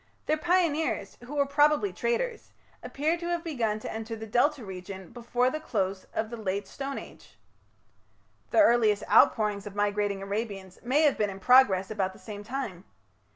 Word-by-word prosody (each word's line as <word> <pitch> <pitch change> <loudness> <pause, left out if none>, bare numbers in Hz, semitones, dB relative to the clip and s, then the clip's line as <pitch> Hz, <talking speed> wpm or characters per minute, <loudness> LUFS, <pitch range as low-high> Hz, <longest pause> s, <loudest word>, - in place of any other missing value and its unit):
Their 310 - +2
pioneers, 320 - 0
who 285 +4 -7
were 285 -1 +3
probably 295 +7 +3
traders, 475 -1 -2 0.3
appear 315 +5 -1
to 340 - -5
have 345 -1 -1
begun 235 -10 -1
to - - -5
enter 225 +1 -5
the 220 0 -7
Delta 245 +3 +1
region 190 -1 -8
before 245 +1 0
the 310 - -3
close 195 -9 -2
of 220 +1 -3
the 235 - -5
Late 200 -2 -3
Stone 275 +6 -5
Age. - - -12 1.1
The 330 - +5
earliest 225 -7 +4
outpourings 210 -2 +4
of 205 - -9
migrating 205 -1 0
Arabians 200 -2 -5
may 270 +6 +2
have 295 -3 +3
been 210 -1 +2
in 195 0 -7
progress 200 -4 +5
about 190 -3 -1
the - - -15
same 205 -2 -8
time. 220 -7 -5
225 Hz, 170 wpm, -28 LUFS, 200-290 Hz, 1.1 s, The